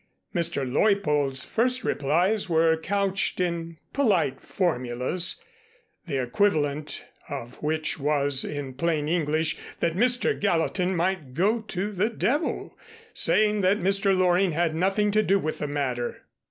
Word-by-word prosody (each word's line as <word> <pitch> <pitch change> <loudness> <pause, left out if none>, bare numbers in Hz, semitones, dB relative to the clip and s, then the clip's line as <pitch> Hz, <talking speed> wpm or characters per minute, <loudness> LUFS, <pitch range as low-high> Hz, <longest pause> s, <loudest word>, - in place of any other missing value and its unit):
Mr. 170 -7 0
Leuppold's 145 -4 +2
first 250 +2 +1
replies 180 +9 +1
were 160 0 +4
couched 195 +4 -1
in 170 -2 -2 0.2
polite 190 - +1
formulas, 130 0 -1 0.7
the 140 -4 -1
equivalent 150 +1 0 0.2
of 125 -3 -7
which 155 +1 -1
was, 140 -1 +1
in 145 -3 -5
plain 150 +1 0
English, 160 -1 0 0.2
that 165 - +1
Mr. 245 +4 +2
Gallatin 180 0 +1
might 170 -7 -1
go 210 +7 +2
to 195 +1 -2
the 205 +2 0
devil, 275 +7 -1 0.4
saying 210 -1 +3
that 190 +2 +3
Mr. 195 +1 +2
Loring 180 0 +3
had 165 0 +1
nothing 195 +5 +1
to 215 +1 +3
do 200 -2 +3
with 155 -5 -3
the 150 - -2
matter. 130 -4 -3
170 Hz, 130 wpm, -26 LUFS, 150-195 Hz, 0.7 s, were